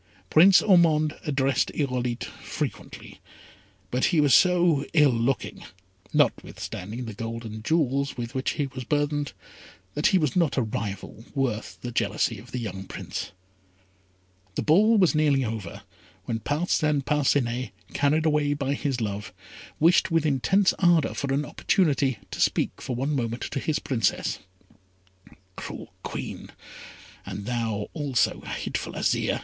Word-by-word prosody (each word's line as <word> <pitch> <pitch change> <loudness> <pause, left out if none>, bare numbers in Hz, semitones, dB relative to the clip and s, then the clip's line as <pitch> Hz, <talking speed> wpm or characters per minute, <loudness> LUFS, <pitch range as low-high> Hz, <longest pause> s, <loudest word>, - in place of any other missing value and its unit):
Prince 180 +4 +7
Ormond 160 -5 +4
addressed 135 -2 +1
Irolite 125 -4 -1
frequently; - - -6 0.7
but 125 +1 +1
he 170 - +2
was 145 -4 +4
so 175 -5 +4
ill 150 -4 +5
looking, 120 +3 -1 0.5
notwithstanding 110 +7 -1
the 110 - -6
gold 115 +2 -5
and 110 0 -7
jewels 140 -2 0
with 120 +1 -5
which 130 -1 -1
he 145 - -1
was 130 -1 -7
burthened, 145 +1 -1 0.6
that 150 - +2
he 190 - +4
was 155 -7 0
not 170 -6 +2
a 130 - +3
rival 105 0 -5
worth 125 -5 -2
the 120 - -5
jealousy 115 -1 0
of 120 +4 -14
the - - -3
young 95 -5 -5
Prince. - - -6 1.2
The - - -1
ball 210 +9 +5
was 185 -4 +4
nearly 145 -4 +2
over, 105 -3 -6 0.4
when 115 -2 -2
Parcin 150 +1 0
Parcinet, 130 -4 +1 0.2
carried 150 +3 +2
away 150 -2 +2
by 140 -1 -1
his 140 -4 -2
love, 105 -1 -3 0.5
wished 170 +5 +4
with 165 -2 +2
intense 185 +8 +3
ardour 175 -4 +4
for 140 -1 -3
an 140 +2 0
opportunity 140 - +1
to - - -4
speak - - +1
for 125 - -3
one 140 +5 -1
moment 120 -2 -2
to - - -3
his 155 +2 0
Princess. 115 -7 -1 1.2
"Cruel - - -8
Queen, - - -6 0.7
and 100 - -6
thou, 115 -3 -2
also, 145 -6 0
hateful - - -4
Azire!" - - 0
140 Hz, 140 wpm, -26 LUFS, 120-155 Hz, 1.2 s, Prince